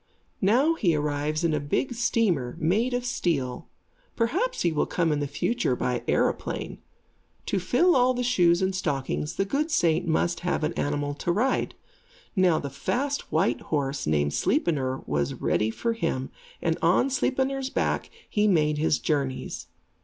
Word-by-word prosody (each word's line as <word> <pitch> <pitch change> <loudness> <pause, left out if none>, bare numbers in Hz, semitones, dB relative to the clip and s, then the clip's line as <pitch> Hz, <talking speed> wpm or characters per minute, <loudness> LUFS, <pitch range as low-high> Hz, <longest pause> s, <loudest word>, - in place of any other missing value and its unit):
Now 250 +11 +4
he 185 - +1
arrives 150 +1 -1
in 165 -2 +2
a 150 - +1
big 145 - -1
steamer, 190 - 0
made 220 +10 +1
of 245 0 -2
steel. 145 - -2 0.5
Perhaps 335 - 0
he 170 - +2
will 150 - 0
come 165 -2 0
in 150 - 0
the 145 - -1
future 225 - 0
by - - -1
aeroplane. - - -1 0.7
To - - 0
fill 360 0 +3
all 255 0 +4
the 250 - -1
shoes 180 -8 +3
and 190 0 +1
stockings, 150 -4 -2
the 195 - 0
good 290 +9 -1
saint 170 - +2
must 170 +1 +1
have 180 -2 -1
an 155 +2 0
animal 145 -1 -1
to 160 +4 -2
ride. 245 +9 0 0.6
Now 185 -4 +4
the 140 -2 -4
fast 275 - -2
white 150 -6 +1
horse, 140 - -2
named 75 -1 +1
Sleipnir, 140 - 0
was 70 -1 -1
ready 110 - 0
for 230 - -1
him, 165 - -2 0.3
and 165 -1 0
on 185 +11 +3
Sleipnir's 265 0 0
back - - -1 0.2
he 210 0 +1
made 150 -6 +2
his 155 -1 +2
journeys. 140 -4 -2
170 Hz, 160 wpm, -26 LUFS, 145-240 Hz, 0.7 s, Now